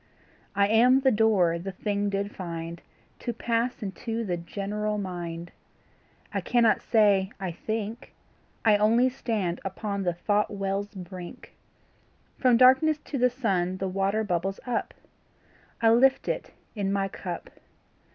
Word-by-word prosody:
I 200 0 +4
am 245 +5 +5
the 265 -1 +4
door 205 -7 +3
the 190 +2 -6
thing 205 +1 -1
did 200 +1 -3
find 170 -2 -6 0.4
To 240 - -3
pass 235 +1 -1
into 225 +4 -3
the 180 -3 -1
general 205 +5 -3
mind; 175 -3 -5 0.8
I - - 0
cannot 235 -3 +3
say 205 -4 +3
I 190 -2 -3
think 220 +5 -5 0.5
I 215 -2 +6
only 230 +5 +4
stand 215 -9 -2
upon 200 +1 -3
the 175 -2 0
thought 205 +4 0
well's 200 +1 -3
brink; 180 -1 -9 0.9
From 250 -2 +5
darkness 265 +5 +6
to 280 - -4
the 250 +1 +4
sun 190 -8 -1
the 190 - -2
water 195 +3 0
bubbles 190 0 -1
up 245 -2 -2 0.9
I 225 - +6
lift 265 +3 +4
it - - -2 0.2
in 200 -3 -1
my 195 0 +1
cup. - - -7
205 Hz, 140 wpm, -27 LUFS, 190-230 Hz, 0.9 s, I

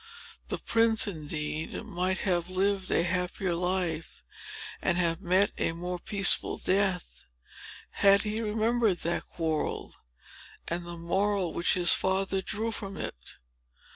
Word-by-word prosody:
The - - -2
prince, 225 -1 +2
indeed, 155 -3 -4
might 185 -2 -2
have 175 -3 0
lived 190 +1 0
a - - +2
happier 180 +1 -1
life, 175 -2 -2 0.6
and 175 -2 +1
have 170 0 0
met 185 +2 +2
a - - 0
more 180 +1 -5
peaceful 195 +2 +3
death, 190 -2 0 0.7
had 200 0 +5
he 215 +1 -2
remembered 220 -1 +1
that 170 - -1
quarrel, 160 -2 -3 0.7
and 170 +1 -4
the 170 0 -7
moral 190 +1 -1
which 170 - +2
his 175 -2 +7
father 190 0 0
drew 220 +4 -3
from 195 -3 -6
it. 60 +1 -8
185 Hz, 130 wpm, -28 LUFS, 170-200 Hz, 0.7 s, his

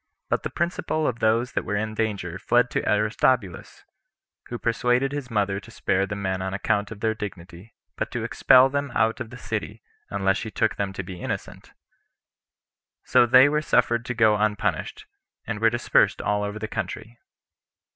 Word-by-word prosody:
But - - +1
the - - -4
principal 170 -2 -2
of 120 -4 -1
those 115 +3 +1
that - - -2
were 105 - -3
in 110 +1 -2
danger 100 -5 -3
fled 120 +4 +2
to - - -1
Aristobulus, 105 -1 0 0.6
who 120 - -5
persuaded 125 +3 +1
his 140 -3 -5
mother 100 -3 0
to - - -15
spare 95 +1 0
the 100 - -4
men 95 -2 -2
on 95 0 -3
account 105 0 0
of 105 -2 -10
their 110 -1 +1
dignity, 95 -1 -9 0.2
but - - -2
to - - -4
expel 130 +1 +5
them 140 +1 -2
out 110 +1 +2
of 110 - -6
the 125 - -10
city, - - -5 0.3
unless 95 +1 +1
she 110 - -5
took - - 0
them 100 -1 -2
to 95 - -5
be 90 -1 -9
innocent; - - -6 1.3
so 120 - +4
they 130 +3 +7
were 150 +1 +1
suffered 120 -5 +2
to 125 - -4
go 110 -2 +4
unpunished, 105 -1 -1 0.4
and 105 - -4
were 115 +1 +4
dispersed 115 -3 +2
all 105 0 0
over 105 +1 -4
the 110 0 -4
country. 110 +3 -6
110 Hz, 180 wpm, -24 LUFS, 100-120 Hz, 1.3 s, they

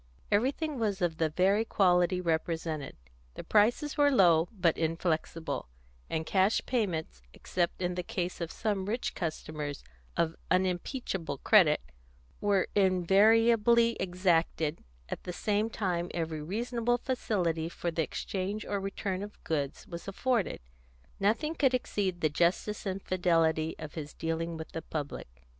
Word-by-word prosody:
Everything 270 +6 +1
was 205 -4 0
of 175 -4 0
the 160 -1 +2
very 190 +7 +3
quality 180 -4 +3
represented; 160 -3 -2 0.4
the - - -6
prices 240 +8 +2
were 290 0 +6
low, 175 - +5
but 180 -7 +2
inflexible, 165 - -2 0.4
and 160 0 -2
cash 190 +5 +3
payments, 175 - -2
except 175 0 -2
in 180 0 0
the 180 - -2
case 180 0 -4
of 165 - -3
some 205 -4 -2
rich 230 +4 -2
customers 155 -4 -4 0.3
of 165 -1 +1
unimpeachable 185 - -1
credit, - - +5 0.6
were 200 -2 +2
invariably 220 +5 +4
exacted; 170 -4 +1 0.3
at - - -5
the 180 - -4
same 210 +4 0
time 180 -5 -2
every 160 -2 -2
reasonable 235 +7 -1
facility 180 -11 -1
for 175 0 -3
the 165 - 0
exchange 195 +6 -3
or 200 - -1
return 195 -1 -3
of 205 0 -9
goods 145 -4 -2
was 170 0 -8
afforded. 225 - 0 0.6
Nothing 230 +11 +1
could 270 -5 +3
exceed 190 -7 -2
the 155 - +4
justice 175 +7 0
and 190 0 -3
fidelity 165 -3 +1
of 150 - -8
his 150 -2 -7
dealing 165 0 -2
with 160 - -8
the 165 - -4
public. 140 - -6
180 Hz, 140 wpm, -30 LUFS, 165-210 Hz, 0.6 s, were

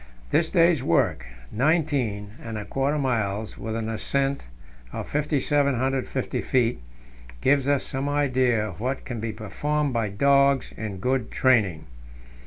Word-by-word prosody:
This 160 -1 +2
day's 170 -5 +4
work 85 - +1 0.2
nineteen 135 -7 0
and 115 -2 -5
a 105 - -5
quarter 140 +2 0
miles, 110 -6 -1
with 110 0 -4
an 115 -1 -3
ascent 135 - -1 0.4
of - - -5
5,750 140 -3 0
feet 120 - +1 0.6
gives 135 - +2
us 145 -1 +2
some 135 +2 -3
idea 130 -6 +2
of - - -9
what 130 +4 -3
can 120 -4 -5
be 110 +1 -3
performed 145 +7 -2
by 115 -3 0
dogs 140 +4 +3
in 105 -3 -5
good 125 +3 -1
training. 105 -11 +2
130 Hz, 135 wpm, -25 LUFS, 110-140 Hz, 0.6 s, day's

